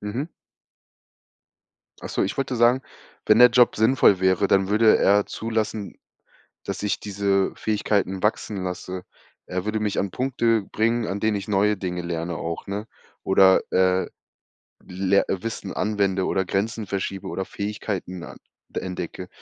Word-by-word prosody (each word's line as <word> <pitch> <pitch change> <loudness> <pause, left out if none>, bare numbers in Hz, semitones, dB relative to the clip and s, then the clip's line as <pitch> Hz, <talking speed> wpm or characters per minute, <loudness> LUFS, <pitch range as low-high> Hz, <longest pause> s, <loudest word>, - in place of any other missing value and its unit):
Mhm. 120 +10 -4 1.7
Ach - - -6
so, - - 0
ich 95 - -2
wollte 135 -2 -2
sagen, 120 +3 +4 0.4
wenn 105 +1 +5
der 125 - +9
Job 120 0 +4
sinnvoll 110 -4 +4
wäre, 95 +1 +2
dann 95 0 +3
würde 110 +1 +5
er 100 +1 +4
zulassen, 110 -2 -3 0.7
dass - - -5
ich 105 - 0
diese 100 -1 0
Fähigkeiten 100 -3 -1
wachsen 105 -2 -1
lasse. 90 0 -5 0.4
Er 90 +2 -4
würde 110 0 0
mich 105 -2 -1
an 100 - 0
Punkte 120 -3 +1
bringen, 115 +3 0
an 100 +1 -3
denen 110 0 +1
ich 100 +1 -6
neue 105 +1 +2
Dinge 90 -2 -4
lerne 85 0 -3
auch, 85 0 -5
ne, 100 +2 -4 0.4
oder, 95 0 +5
äh, 95 0 +2 0.8
ler 95 +2 +1
Wissen 115 +4 -4
anwende 100 -3 0
oder 95 - 0
Grenzen 105 +4 -2
verschiebe 95 0 -4
oder 95 - -3
Fähigkeiten 100 -4 -5
an - - -10 0.4
entdecke 90 0 -5
100 Hz, 145 wpm, -24 LUFS, 95-110 Hz, 1.7 s, der